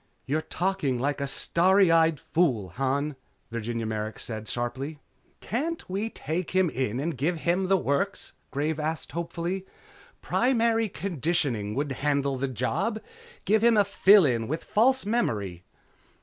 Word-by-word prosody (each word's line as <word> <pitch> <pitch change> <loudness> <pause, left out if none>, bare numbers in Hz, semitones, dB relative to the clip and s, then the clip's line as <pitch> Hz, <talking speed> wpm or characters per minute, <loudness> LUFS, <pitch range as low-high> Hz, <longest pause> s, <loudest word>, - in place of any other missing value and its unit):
"You're 150 +4 0
talking 160 -8 -1
like 140 +3 -1
a 140 - -1
starry 185 +6 +3
eyed 165 -2 +4
fool, 125 - +1
Han," 135 - -1 0.4
Virginia 115 0 -3
Merrick 110 0 -3
said 110 -2 -6
sharply. 130 +7 -3 0.4
"Can't 320 +9 -3
we 200 +4 -2
take 165 -2 -3
him 185 -4 +3
in 125 -2 -1
and 160 +2 -2
give 155 +5 -1
him 180 +2 +1
the 195 0 +4
works?" 190 +6 -1 0.2
Graves 150 +3 -1
asked 155 +1 -3
hopefully. 170 +2 -3 0.6
"Primary 230 -3 +2
Conditioning 145 - -1
could 145 +1 -1
handle 140 0 0
the 135 - 0
job. 130 - -1 0.5
Give 215 +3 +3
him 235 -2 +5
a 205 - +5
fill 200 -1 +6
in 115 -4 0
with 155 +4 -3
false 260 +4 +2
memory?" 105 - -1
155 Hz, 145 wpm, -27 LUFS, 130-190 Hz, 0.6 s, fill